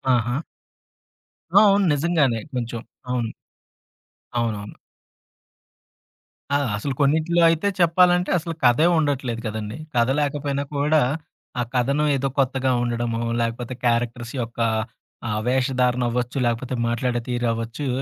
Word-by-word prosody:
ఆహా! 120 +4 0 1.2
ఆ! - - +8
అవును 200 0 +4
నిజంగానే 145 -6 +2
కొంచెం, 120 -2 -3 0.3
అవును. 120 -3 -1 1.1
అవునవును. 105 -3 -2 1.8
ఆ! - - +5 0.2
అసలు 135 +6 -3
కొన్నింటిలో 160 +4 +3
అయితే 165 +4 +1
చెప్పాలంటే, 180 +1 +4
అసలు 165 0 -4
కథే 125 +6 +5
ఉండట్లేదు 135 -6 -1
కదండీ! 110 +1 -5 0.2
కథ 120 -1 +3
లేకపోయినా 145 -1 -1
కూడా, 150 +2 +3 0.6
ఆ - - +2
కథనం 140 +5 +2
ఏదో 135 0 -1
కొత్తగా 130 -1 +1
ఉండడమో, 120 -1 -1 0.2
లేకపోతే 115 +2 -3
క్యారెక్టర్స్ 120 0 0
యొక్క, 115 0 -7 0.7
ఆ - - -1 0.2
వేషధారణ 125 -1 +1
అవ్వచ్చు, 125 +2 -2
లేకపోతే 120 +2 -2
మాట్లాడే 120 +1 0
తీరవ్వచ్చు, 120 +2 -2
125 Hz, 110 wpm, -23 LUFS, 120-145 Hz, 1.8 s, ఆ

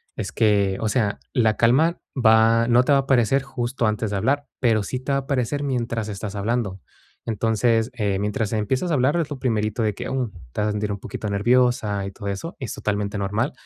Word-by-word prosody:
es - - -4
que, 100 -3 +2
o 110 - 0
sea, 105 -3 0
la 110 -4 +3
calma 135 - +3 0.2
va 115 0 +5
no 120 +1 +5
te 135 - 0
va - - +6
a - - +3
aparecer 135 0 +2
justo 125 -2 -2
antes 110 0 0
de 100 - -2
hablar, 140 +7 0
pero 115 -4 +3
sí 125 +5 -4
te 130 +2 -4
va 140 - +2
a - - -4
aparecer 135 +1 -1
mientras 120 -5 -2
estás 100 0 -5
hablando. 100 -2 -2 0.4
Entonces, 115 +1 +1
eh, 100 -5 -1
mientras 105 +2 -2
empiezas 130 - 0
a 165 - 0
hablar, 140 +4 +2
es 160 -3 -1
lo 145 - -5
primerito 115 -2 0
de 105 -2 +1
que, - - -6
mm, 130 -5 -2 0.2
te - - -2
vas 105 - +1
a - - 0
sentir 105 0 -2
un 100 - -4
poquito 105 +1 -5
nerviosa 105 -2 +2
y 100 - -5
todo 100 0 -6
eso, 100 - -5
es 130 -6 -4
totalmente 100 0 -2
normal. 105 +8 -1
115 Hz, 220 wpm, -23 LUFS, 105-130 Hz, 0.4 s, va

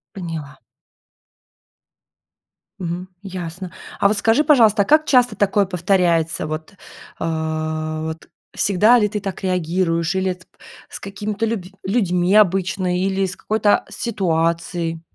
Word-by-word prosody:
Поняла. 165 -6 -6 2.2
Мгм. 180 0 -4 0.2
Ясно, 180 -1 -6 0.3
а - - +5
вот 210 +1 +1
скажи, 225 +8 +3
пожалуйста, 225 -9 +5
а - - -10
как 310 +4 +4
часто 245 -6 +3
такое 205 0 +2
повторяется? 170 -3 +1
Вот, 155 +2 -5 0.5
э, 155 -1 -2
вот, 160 0 -6 0.2
всегда 210 +5 +4
ли 210 -3 +3
ты 210 - -3
так 195 0 -6
реагируешь 175 -1 0
или, 190 0 +1
э, - - -4
тп 185 0 -21 0.4
с - - -8
какими-то 205 +2 -3
люб 225 -3 -2 0.2
людьми 185 -4 +1
обычно 185 -2 +2
или 190 +1 0
с 190 0 -5
какой-то, 215 -1 +2
а, - - -22
ситуацией? 170 -4 -1
185 Hz, 130 wpm, -20 LUFS, 165-205 Hz, 2.2 s, а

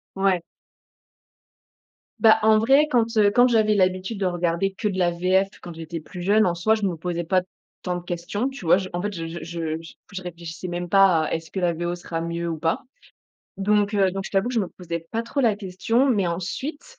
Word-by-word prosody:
Ouais. 195 -2 +2 1.8
Bah, 220 -1 +6
en 215 0 +5
vrai, 275 +7 +4
quand, 240 -5 +3
heu, 205 -1 +6
quand 245 +4 +5
j'avais 220 -2 +3
l'habitude 185 +2 0
de 195 - 0
regarder 175 +1 0
que 200 +2 -2
de 190 - -2
la 175 -2 +2
VF 185 +3 +2
quand 175 - -8
j'étais 165 0 -6
plus 175 +3 -9
jeune, 210 +4 +4
en 175 - +1
soi, 185 +6 +2
je 215 - -5
me 185 -3 0
posais 170 +1 -3
pas 185 +2 +2 0.4
tant 180 -1 -2
de 175 - -8
questions, 175 +7 -3
tu 270 -6 -7
vois? 165 - +6
J 190 -1 -3
en 175 - -2
fait, 205 +2 -2
je 165 -3 -5
je 170 +1 -6
je 165 -1 -3 0.4
je 190 - -5
réfléchissais 175 0 -7
même 175 0 -3
pas 190 -4 +5
à: - - -4
«Est-ce 160 -1 -4
que 190 - -3
la 175 -1 +1
VO 175 +1 -3
sera 170 -1 -5
mieux 170 0 -3
ou 165 - -3
pas?» 165 +1 0 0.8
donc, 205 +1 +2
heu, 195 -2 +3
donc 195 0 -4
je - - -6
t'avoue 195 +4 +1
que 250 - -4
je 230 - +2
me 190 - -2
posais 170 -2 -6
pas 230 - -1
trop 275 +4 -2
la 220 -5 +3
question. 205 +7 0
Mais 205 -7 +2
ensuite, 275 - -5
185 Hz, 225 wpm, -24 LUFS, 170-210 Hz, 1.8 s, Bah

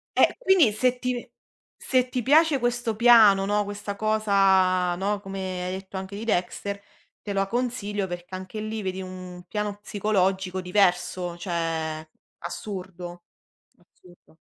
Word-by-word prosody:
Eh, - - +4
quindi 375 - +4
se 250 +3 +1
ti 250 0 -1
ve 240 - -7 0.5
se 255 -1 +1
ti 250 0 -2
piace 300 +2 +4
questo 240 -2 -1
piano, 220 -4 +7
no, 205 0 +1
questa 205 0 -6
cosa, 195 -4 +3
no, 200 +3 -1
come 190 -2 -5
hai 180 - -3
detto 190 0 -7
anche 190 +1 -6
di 215 - -6
Dexter, 200 0 -2 0.4
te 205 - -5
lo 195 0 +1
consiglio 210 -4 -2
perché 175 +1 -7
anche 185 +3 -6
lì 215 0 -4
vedi 190 0 -3
un 185 -1 -9
piano 210 -1 -2
psicologico 190 -3 0
diverso, 180 -1 +1
cioè 165 -3 -3 0.3
assurdo, 180 -3 -7 0.8
assurdo. 175 -3 -20
195 Hz, 140 wpm, -25 LUFS, 185-215 Hz, 0.8 s, piano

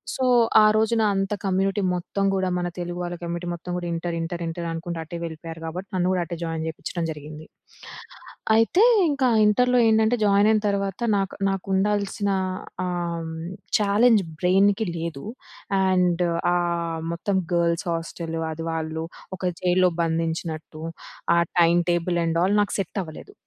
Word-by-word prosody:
So, 260 - -2 0.4
ఆ - - +6
రోజున 220 +1 +2
నా - - +3
అంత 195 +1 -1
కమ్యూనిటీ 195 +2 +1
మొత్తం 195 +3 -2
గూడా, 190 -1 0
మన 175 - -1
తెలుగు 175 0 -4
వాళ్ళ 175 0 -4
కమ్యూనిటీ 170 +1 -4
మొత్తం 175 +1 -8
గూడా 175 -1 -3
ఇంటర్ 170 0 -3
ఇంటర్ 170 +1 -4
ఇంటర్ 170 +1 -4
అనుకుంట 165 +1 -5
అటే 170 - -8
వెళ్ళిపోయారు 165 0 -7
కాబట్టి. 180 +4 -5
నన్ను 180 -1 +1
గూడా 185 -1 +1
అటే 170 - -5
జాయిన్ 165 -1 -3
చేపించడం 165 +2 -4
జరిగింది. 150 +1 -9 1.1
అయితే 225 - +4 0.3
ఇంకా 280 -3 +1 0.2
ఇంటర్‌లో 250 +4 +3
ఏంటంటే, 220 +1 +3
జాయిన్ 200 0 +4
అయిన 215 -1 +2
తర్వాత, 200 -1 -2 0.2
నాకు 195 0 -2
నాకు 195 -1 -3
ఉండాల్సిన 200 +1 0 0.6
ఆహ్, 170 -2 -3 0.5
చాలెంజ్ 210 +1 +4 0.2
బ్రైన్‌కి 195 +3 +3
లేదు. 165 -4 -5 0.6
అండ్ 180 -1 +2 0.3
ఆహ్, 170 -2 -1
మొత్తం 190 +3 -1 0.2
గర్ల్స్ 170 -1 +1
హోస్టల్. 165 0 -4
అది 165 +1 -5
వాళ్ళు 160 0 -3 0.3
ఒక - - -12 0.2
జైల్‌లో 180 0 +3
బంధించినట్టు. 160 -1 -3 0.5
ఆ - - +5 0.2
టైమ్ 170 +1 +5
టేబుల్ 175 0 0
అండ్ 165 0 0
ఆ‌ల్ 195 +3 +2
నాకు 205 - -1
సెట్ 195 +1 -3
అవ్వలేదు. 165 - -11
175 Hz, 150 wpm, -24 LUFS, 165-200 Hz, 1.1 s, ఆ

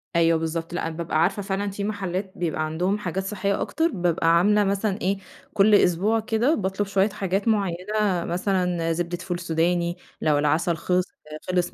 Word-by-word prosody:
أيوه 165 -1 +4
بالضبط، 165 +1 -3
لأ، 175 - -2
أنا 165 - -6
بابقى 160 -2 0
عارفة 195 +4 +1
فعلًا 200 +1 -2
في 200 +1 -5
محلّات 195 -2 -3
بيبقى 160 -2 -1
عندهم 180 +6 0
حاجات 190 -2 -3
صحّية 200 0 -1
أكتر 325 +1 +1
بابقى 170 -2 +2
عاملة 210 +4 +4
مثلًا 200 +1 -1
إيه، 195 +2 +1 0.4
كل 210 +1 +5
أسبوع 200 +5 +3
كده 230 +6 +1
باطلُب 195 +1 -1
شوية 200 +1 +2
حاجات 195 +1 -2
معيّنة 200 -2 0
مثلًا 180 -2 0
زبدة 175 +1 -2
فول 180 -1 -4
سوداني 170 +1 0 0.2
لو 150 -2 +3
العسل 155 +4 +1
خِلِص 180 +2 +1 0.4
خِلِص 180 -1 0
185 Hz, 170 wpm, -24 LUFS, 170-200 Hz, 0.4 s, كل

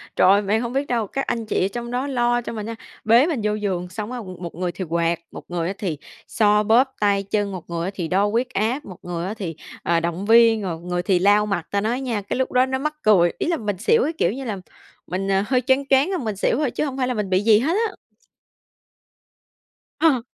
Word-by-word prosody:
Trời 185 - +5
ơi, 200 - +5
bạn 210 +2 0
hông 240 0 -4
biết 275 +2 -1
đâu. 230 -4 0
Các 275 +5 -3
anh 230 -1 -2
chị 210 - 0
ở - - +2
trong 235 0 -5
đó 255 +3 -1
lo 240 -2 +1
cho 235 - -6
mình 215 -2 -5
nha, 230 +1 -5 0.3
bế 235 +6 +5
mình 305 -9 -1
vô 210 0 +1
giường 185 -4 -2
xong 210 +4 -6
á, 250 - -4
m 185 -2 -9
một 170 - -6
người 175 0 -2
thì 185 - -5
quạt, 170 +1 0
một - - -9
người 170 -1 -2
á 190 - -2
thì 175 -7 -3 0.3
xoa 210 -1 +3
bóp 245 +5 +3
tay 200 -1 +2
chân, 205 0 -1
một 185 -3 -8
người 170 0 -2
á - - -3
thì 175 -4 -3
đo 190 +5 +2
huyết 235 +5 0
áp, 230 +8 -1
một 185 -3 -10
người 175 -1 -4
á 200 - -3
thì, 185 -7 -5 0.3
ờ, 170 0 +2
động 170 +3 -3
viên, 225 0 +5
rồi 175 -5 -4
người 175 +1 -3
thì 185 -1 +2
lau 205 +3 +4
mặt. 195 -5 -2
Ta 200 0 +1
nói 235 +5 -1
nha, 235 -6 -2
cái 200 - -4
lúc 260 - -1
đó 255 0 +4
nó 265 0 -2
mắc 305 +2 -2
cười. 180 -5 +4
Ý - - -1
là 340 -1 +1
mình 210 -6 -3
xỉu 460 - +3
cái 320 - -1
kiểu 170 - +2
như 270 +2 -6
là 215 -4 -3 0.5
mình, 195 +2 -2
à, 195 +1 +2
hơi 255 -2 +2
choáng 265 +2 +2
choáng 270 +5 +4
rồi 375 -2 -1
mình 220 -5 -3
xỉu 200 - +1
thôi, 290 -4 0
chứ - - -1
không 270 -2 -4
phải 255 -2 0
là 250 - 0
mình 210 -4 -3
bị 185 0 +3
gì 215 -1 +6
hết 310 +8 0 0.2
á. - - -12 2.1
Ờ. 275 -8 +3
210 Hz, 265 wpm, -22 LUFS, 185-250 Hz, 2.1 s, gì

